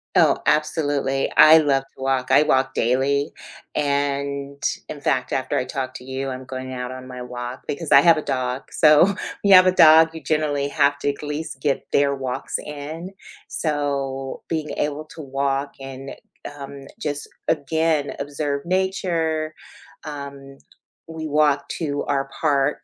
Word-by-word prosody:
Oh, - - +4
absolutely. 145 -3 +1
I 160 +1 +9
love 140 -3 +2
to - - -14
walk. 130 -1 0
I - - +6
walk 135 -2 +1
daily, 135 +4 +1 0.4
and 140 -1 -1 0.3
in 150 - -6
fact, 130 -2 0
after 130 - -1
I - - +1
talk 130 0 -4
to 125 - -8
you, 130 +1 -4
I'm 130 0 -6
going 130 0 -6
out 125 0 -5
on 130 0 -9
my 125 -1 -8
walk 125 +1 -6
because 155 +1 -2
I 140 - +9
have 165 +1 +6
a - - -1
dog, 130 -2 -2
so, 155 +6 +5 0.3
you 200 -1 +6
have 185 0 +9
a - - +6
dog, 160 -2 +7
you 160 - -8
generally 145 -1 0
have 145 0 +2
to 145 - 0
at 140 - -12
least 150 -2 -5
get 140 -2 -1
their 140 0 +3
walks 130 -2 -3
in. 155 +5 -7 0.4
So 140 -3 -2
being 155 -2 -2
able 150 +1 -2
to 160 - -8
walk 140 0 -1
and, 135 0 -8 0.5
um, 140 0 -9
just 145 -7 -4 0.2
again 160 0 0
observe 140 0 -3
nature. 170 -4 -1 0.5
Um, 140 -2 -8 0.5
we 160 -1 -6
walk 150 -1 +2
to 145 -4 -2
our 135 -1 -1
park 145 -2 +1
140 Hz, 160 wpm, -22 LUFS, 135-155 Hz, 0.5 s, I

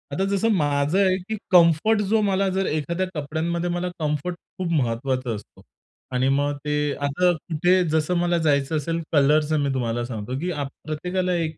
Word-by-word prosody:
आता 190 - 0
जसं 225 +4 +1
माझं 145 -1 +1
आहे 190 -2 +3
की 220 - -1 0.2
कम्फर्ट 175 +5 +5
जो 220 -1 +4
मला 195 -1 +1
जर 190 +1 0
एखाद्या 170 +4 -1
कपड्यांमध्ये 165 +4 -2
मला 175 +1 -2
कम्फर्ट 155 +3 -2 0.2
खूप 180 -2 -2
महत्त्वाचा 130 -3 -1
असतो. 105 - -12 0.5
आणि 130 +1 +1
मग 145 +1 0
ते 150 0 0 0.2
आता 145 +6 +1
कुठे 175 +3 +1
जसं 155 +2 +1
मला 175 0 +1
जायचं 150 -2 +1
असेल, 165 +3 -2
कलरचं 150 +1 +3
मी 140 - 0
तुम्हाला 120 -2 -1
सांगतो, 120 +1 -5
की 180 +4 -2 0.3
प्रत्येकाला 180 +4 -2
एक 165 -3 -2
160 Hz, 165 wpm, -23 LUFS, 145-180 Hz, 0.5 s, कम्फर्ट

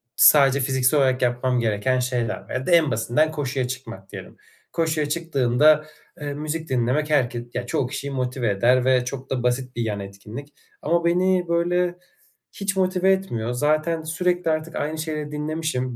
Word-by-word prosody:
sadece 140 -2 +6
fiziksel 130 +2 +2
olarak 130 -1 +2
yapmam 125 +1 +1
gereken 115 +3 +1
şeyler 125 -3 -2
ya 130 0 -3
da - - +1
en 165 -5 +5
basitinden 120 +8 +1
koşuya 135 -4 -2
çıkmak 115 -7 -8
diyelim. - - -10 0.3
Koşuya 160 -3 0
çıktığında, 150 -1 +3 0.4
eee, 145 -1 -3
müzik 155 +2 -4
dinlemek 130 +4 0
herke 120 -5 +1
ya 120 - -3
çoğu 125 +1 -1
kişiyi 140 +2 -5
motive 125 -3 -1
eder 125 +5 +3
ve 130 -1 +3
çok 130 +1 -6
da 130 -2 -2
basit 125 +1 -1
bir 120 - -2
yan 105 -2 -2
etkinlik 105 +9 -9 0.3
ama 170 +2 +1
beni 180 +1 +2
böyle 175 +1 +1 0.6
hiç 200 0 -2
motive 185 0 +2
etmiyor. 120 -13 -1
Zaten 155 +5 +1
sürekli 175 +1 0
artık 155 +1 -3
aynı 155 +2 -2
şeyleri 155 -2 -4
dinlemişim, 150 -5 -3
140 Hz, 160 wpm, -23 LUFS, 125-160 Hz, 0.6 s, sadece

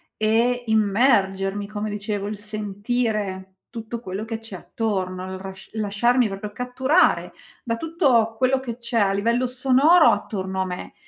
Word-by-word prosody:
e 235 +3 +1
immergermi, 205 -2 +2
come 210 0 -4
dicevo, 205 -1 -3
il 210 - -4
sentire 205 -2 -2
tutto 230 0 -6
quello 195 -1 -5
che 225 0 -5
c'è 225 -4 -9
attorno, 185 -2 -3
il 190 0 -6
r 190 0 -7 0.2
lasciarmi 220 +3 +1
proprio 205 +1 -6
catturare 260 - +1 0.3
da 230 -2 -1
tutto 250 -7 +1
quello 260 +1 +2
che 240 -3 -6
c'è 235 -1 -1
a 195 -1 +3
livello 235 +6 +1
sonoro 270 +7 +4
attorno 190 -2 -1
a - - 0
me 180 -1 -6
215 Hz, 145 wpm, -23 LUFS, 200-245 Hz, 0.3 s, sonoro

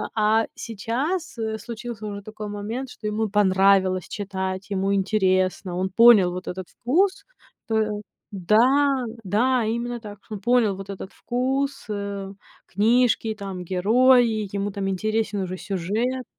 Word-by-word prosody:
а 220 +1 +3
сейчас, 255 - -3
э, 220 -1 -2
случился 230 0 -7
уже 200 -1 -6
такой 215 0 -7
момент, 220 +6 -5
что 215 - -12
ему 215 +1 -1
понравилось 190 -2 +3
читать, 190 -1 -4
ему 195 0 0
интересно, 185 -2 +1
он 190 +1 -1
понял 215 -4 +7
вот 180 +1 -7
этот 185 0 -5
вкус. 370 +11 0 0.4
То 215 -2 0 0.3
да, 250 +8 +3 0.2
да 235 +6 +2
именно 235 +2 -2
так. 205 -2 -9
Что 215 - -7
он 195 - -8
понял 235 -3 +3
вот 195 0 -9
этот 195 -1 -7
вкус, 270 +3 -2
э, 200 -1 -4 0.3
книжки, 225 +2 +2
там 195 -3 -6
герои, 220 +4 +3
ему 200 0 -2
там 195 0 -3
интересен 215 +1 -1
уже 185 0 -4
сюжет. 210 +8 -2
210 Hz, 140 wpm, -24 LUFS, 195-235 Hz, 0.4 s, понял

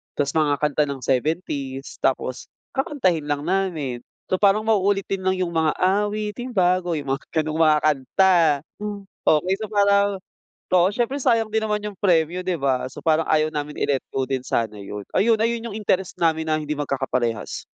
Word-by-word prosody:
tapos 140 -1 -1
mga 150 -2 +3
kanta 150 0 +2
ng 140 -2 -5
70s, 135 0 -2
tapos 130 -1 -1 0.3
kakantahin 245 - 0
lang 145 -1 -1
namin. 170 -9 -1 0.3
So, 185 - +2
parang 205 +1 +4
mauulit 200 -2 +2
din 195 -1 -2
lang 185 - +3
yung 175 -2 -2
mga 160 -1 +2
"Awiting 210 +4 0
bago," 180 -2 +2
yung 140 -2 -5
mga 135 - -4 0.2
gano'ng 155 +1 -3
mga 155 -1 +5
kanta. 155 +6 +3 0.9
Okey, 170 +5 +3
so 215 - -3
parang, 200 -1 +3 0.6
oo, 180 +1 +5
siyempre 245 +4 -1
sayang 230 -4 +2
din 220 0 0
naman 210 -1 -1
yung 210 -2 -6
premyo, 175 -2 +2
'di 185 - 0
ba? 130 -2 +1
So, - - -10
parang 160 0 +2
ayaw 155 0 +3
namin 150 -1 -5
i-let 135 -2 +1
go 135 - 0
din 130 -1 -2
sana 110 -4 -1
yun, 100 +1 -7 0.2
ayun. 225 +1 +4
Ayun 230 0 0
yung - - -4
interest 190 -3 -1
namin 160 -1 +2
na 155 0 +2
hindi 150 0 -4
magkakaparehas. 130 -5 -2
165 Hz, 175 wpm, -23 LUFS, 145-200 Hz, 0.9 s, mga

